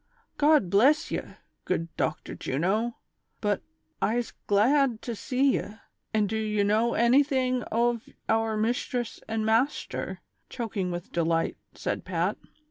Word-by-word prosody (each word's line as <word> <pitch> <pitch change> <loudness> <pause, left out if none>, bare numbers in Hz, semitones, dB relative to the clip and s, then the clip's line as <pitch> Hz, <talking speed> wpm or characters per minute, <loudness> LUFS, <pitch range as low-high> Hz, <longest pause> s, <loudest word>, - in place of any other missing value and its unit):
'* - - -45
God 295 - +5
bless 285 - +4
ye, - - 0 0.4
good 165 0 -2
Dochter - - -2
Juno, 200 - -1 0.4
but 205 -2 0 0.4
I'se 235 +2 0
glad 240 +4 +3
to 235 - -3
see 265 +5 +2
ye; 210 - -7 0.4
an' 215 -2 +2
do 220 +2 -2
ye 210 -1 +1
know 220 +4 +2
anyting 255 0 +3
ov 235 0 +1 0.2
our 225 -1 +1
mishtress 240 +1 -1
an' 220 0 -1
mashter 230 +6 0
V - - -25 0.2
" - - -46
choking 210 -6 -2
with 175 -1 -5
delight, 165 -1 +1 0.2
said - - -3
Pat. - - -1
225 Hz, 140 wpm, -27 LUFS, 205-250 Hz, 0.4 s, God